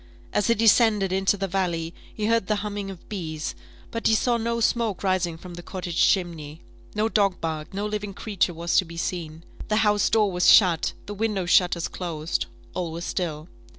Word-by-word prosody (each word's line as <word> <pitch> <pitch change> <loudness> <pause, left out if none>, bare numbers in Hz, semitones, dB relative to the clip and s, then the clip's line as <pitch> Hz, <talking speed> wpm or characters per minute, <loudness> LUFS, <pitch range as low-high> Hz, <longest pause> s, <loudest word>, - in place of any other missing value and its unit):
As 210 - +1
he 235 - +4
descended 215 -3 +4
into 190 +2 +2
the 195 0 -2
valley, 170 -3 -1 0.2
he 215 - -3
heard 230 -3 +2
the 215 - +2
humming 205 -1 -4
of 190 -3 -10
bees, 160 -6 -4 0.4
but 230 - -1
he 220 - +4
saw 240 +2 +2
no 235 +1 -1
smoke 225 -3 0
rising 185 -3 0
from 175 +1 -10
the 175 - -8
cottage 175 -1 -3
chimney 165 -5 0 0.3
no 215 +1 +2
dog 200 -4 +1
barked 160 +1 -4
no 200 +1 -2
living 210 -2 -4
creature 195 -6 -1
was 170 +1 0
to - - +5
be 165 0 -10
seen 165 -2 -4 0.2
the 215 - +1
house 210 -1 +3
door 210 -3 +3
was 180 0 +5
shut 180 -6 +5
the 205 - -6
window 205 -3 -1
shutters 175 -1 +3
closed 165 -3 -3 0.3
all 175 -3 -3
was 170 +2 -5
still. 160 -4 -3
190 Hz, 190 wpm, -25 LUFS, 170-210 Hz, 0.4 s, to